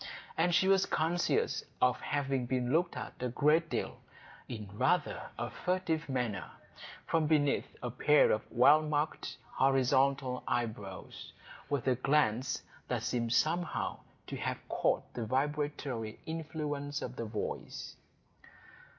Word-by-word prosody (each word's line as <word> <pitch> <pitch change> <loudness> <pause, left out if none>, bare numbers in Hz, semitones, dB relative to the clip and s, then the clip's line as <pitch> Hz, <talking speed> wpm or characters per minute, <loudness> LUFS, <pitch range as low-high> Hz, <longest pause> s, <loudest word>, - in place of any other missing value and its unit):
And 175 +1 +3
she 190 - +4
was 195 0 +4
conscious 175 - +1 0.2
of - - +3
having 135 -3 -1
been 125 -1 0
looked 170 +2 +2
at - - -5
a 125 - 0
great 150 +6 +3
deal, - - -3 0.5
in 110 -4 -5
rather 145 +8 +1
a 120 -1 -3
furtive 165 +2 -1
manner, 120 -8 -2 0.6
from 160 -2 +2
beneath 145 -2 +2 0.2
a 120 - -2
pair 150 +5 +5
of 110 - +2
well 145 +6 +6
marked 155 0 -2 0.2
horizontal 135 0 +3
eyebrows, 105 -5 -4 0.4
with 140 -3 -1
a 130 - +5
glance 130 -2 +1 0.2
that - - -1
seemed 115 -2 -1
somehow 170 +6 +1 0.3
to - - -5
have - - -4
caught - - +1
the 120 - -3
vibratory 135 -4 -1
influence 150 -3 -3
of 125 - -5
the 115 - -4
voice. 105 -1 -5
140 Hz, 130 wpm, -32 LUFS, 125-155 Hz, 0.6 s, well